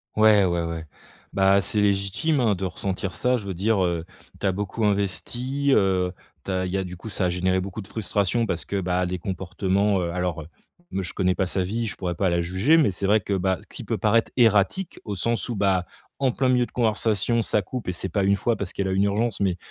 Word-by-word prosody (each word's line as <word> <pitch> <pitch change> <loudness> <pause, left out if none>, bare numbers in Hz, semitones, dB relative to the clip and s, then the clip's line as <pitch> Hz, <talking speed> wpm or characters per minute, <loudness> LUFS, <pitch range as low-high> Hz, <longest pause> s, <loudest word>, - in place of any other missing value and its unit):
Ouais, 105 -2 +6
ouais, 85 -2 +1
ouais. 85 -1 -4 0.5
Bah 95 0 +4
c'est 105 +3 +1
légitime 100 +10 +1
hein, 110 -5 +2
de 95 - -3
ressentir 95 0 -3
ça, 125 0 +1
je 105 - -7
veux 95 - -3
dire, 100 +2 +1
heu, 85 -2 -1 0.4
tu 100 - 0
as - - +3
beaucoup 100 +3 -3
investi, 120 +7 0
heu, 95 -2 +2 0.3
tu - - -8
as 95 0 0
il 90 - -4
y 95 - 0
a 95 - -1
du 90 -1 -8
coup 110 - -8
ça 95 -2 +1
a - - +2
généré 95 +1 +1
beaucoup 100 +3 -6
de 95 - -14
frustration 110 +2 0
parce 85 -4 -2
que, 100 -1 -2
bah, 90 0 0
des 90 0 -3
comportements, 95 +2 0
heu, 85 -1 -2
alors 85 -3 -3 0.4
me 95 - -2
je - - -6
connais 90 -2 +1
pas 95 - +1
sa 95 +1 -1
vie, 110 +6 -2
je 105 - -4
pourrais 90 -2 -3
pas 95 0 +1
la 85 - +1
juger 95 - +3
mais 155 -8 +4
c'est 95 +1 -3
vrai 105 +2 +4
que, 100 0 -3
bah, 95 -1 0
ce - - -20
qui - - -8
peut - - -2
paraître 110 +1 +2
erratique, 115 - +2
au 105 - -3
sens 115 +5 -1
où, 120 - -3
bah, 95 -2 +1 0.3
en 135 -2 +2
plein 130 +1 0
milieu 125 -1 +3
de - - -17
conversation, 110 0 +1
ça 105 - +2
coupe 120 +4 -6
et 90 - -1
c'est 95 +2 -3
pas 100 +4 0
1 100 +1 +4
fois 115 +3 0
parce 95 -3 -5
qu'elle 100 -1 -2
a - - -1
une 95 +1 +2
urgence, 105 +2 0
mais 95 -3 +1
100 Hz, 250 wpm, -24 LUFS, 90-110 Hz, 0.5 s, Ouais